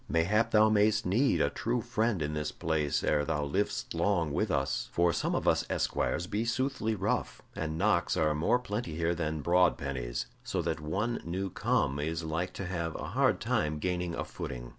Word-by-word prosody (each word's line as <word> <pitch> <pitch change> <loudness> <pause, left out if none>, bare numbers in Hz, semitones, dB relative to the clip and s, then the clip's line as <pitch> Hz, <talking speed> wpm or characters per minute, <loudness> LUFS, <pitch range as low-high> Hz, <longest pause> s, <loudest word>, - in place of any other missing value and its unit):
Mayhap 105 +8 +2
thou 110 -1 +5
mayst 110 0 +3
need 120 +9 +2
a - - +2
true 120 +2 -1
friend 110 -5 0
in 75 +1 -2
this 75 0 -2
place 75 -3 -1
ere 75 -1 +2
thou 75 -1 -1
livest 95 +9 -1
long 85 -3 +1
with - - 0
us, - - -1
for 85 0 +2
some - - 0
of - - -1
us - - +4
esquires 85 - 0
be 105 +4 -1
soothly 115 -1 -1
rough, 100 - -2
and 80 0 -3
knocks 95 -2 +2
are 75 -1 +2
more 75 +10 +2
plenty 105 -8 -4
here 85 +1 +1
than 80 -2 -2
broad 90 +3 +3
pennies, 60 -3 -3 0.2
so - - -2
that - - -1
one 100 +10 -2
new 95 +3 -3
come 70 -3 +1
is 80 +3 -2
like 85 +3 -2
to 100 - -5
have 85 -3 -3
a - - -5
hard - - +2
time 75 0 0
gaining 90 +1 -2
a - - -3
footing." - - -6
85 Hz, 195 wpm, -30 LUFS, 75-105 Hz, 0.2 s, thou